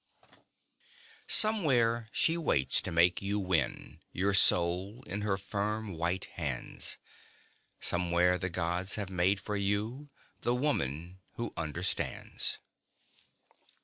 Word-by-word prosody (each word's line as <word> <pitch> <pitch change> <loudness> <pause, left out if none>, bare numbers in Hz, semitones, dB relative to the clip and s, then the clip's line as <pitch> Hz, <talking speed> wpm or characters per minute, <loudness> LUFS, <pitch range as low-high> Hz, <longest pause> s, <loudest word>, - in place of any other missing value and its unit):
_Somewhere 125 - +5
she 165 - +3
waits 70 - +1
to - - -6
make 85 +1 +3
you 100 +1 -2
win, 90 -9 -2
your 100 +3 0
soul 95 +5 +3
in 105 - -5
her 100 -2 -1
firm, 105 +2 -4
white 85 +3 -2
hands 70 -7 -4 0.8
Somewhere 90 +1 +2
the 95 -1 -3
gods 90 +2 -1
have 100 -3 -5
made 95 +2 +1
for 105 - -5
you, 105 +8 -2 0.3
the 120 - 0
Woman 90 - -3
Who 120 -1 -6
Understands! 85 +2 -2
95 Hz, 110 wpm, -30 LUFS, 85-110 Hz, 0.8 s, Somewhere